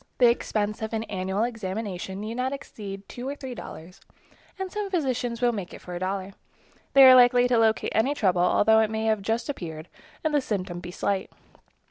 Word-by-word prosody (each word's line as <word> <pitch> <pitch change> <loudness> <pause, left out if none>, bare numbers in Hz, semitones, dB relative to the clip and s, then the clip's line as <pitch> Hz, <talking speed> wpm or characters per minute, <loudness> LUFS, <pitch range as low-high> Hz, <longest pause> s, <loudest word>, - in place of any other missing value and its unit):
The 245 -2 +6
expense 210 -3 -2
of 220 +1 -4
an 220 0 -1
annual 190 0 -2
examination 200 -4 -4
need 215 +2 -4
not 255 +3 -2
exceed 200 -7 -8
two 250 +2 -6
or 285 - -4
three 265 -3 -7
dollars, 180 -6 -10 0.6
and 380 -1 -4
some 420 -1 -3
physicians 255 -9 -1
will 245 -1 +4
make 200 -6 -6
it - - -11
for 180 - -8
a 175 - -4
dollar. 190 +1 -3 0.6
They 275 - +8
are 260 -1 +10
likely 245 0 +6
to 245 -2 +3
locate 220 -1 +2
any 250 +7 +2
trouble, 185 -8 +2
although 220 +5 +4
it 220 -1 +2
may 220 0 -2
have 220 -2 +1
just 225 +3 -1
appeared 160 - -6 0.3
and 315 -1 0
the 290 - +3
symptom 185 -7 -3
be 175 0 -8
slight. 190 +2 -2
220 Hz, 200 wpm, -26 LUFS, 195-245 Hz, 0.6 s, are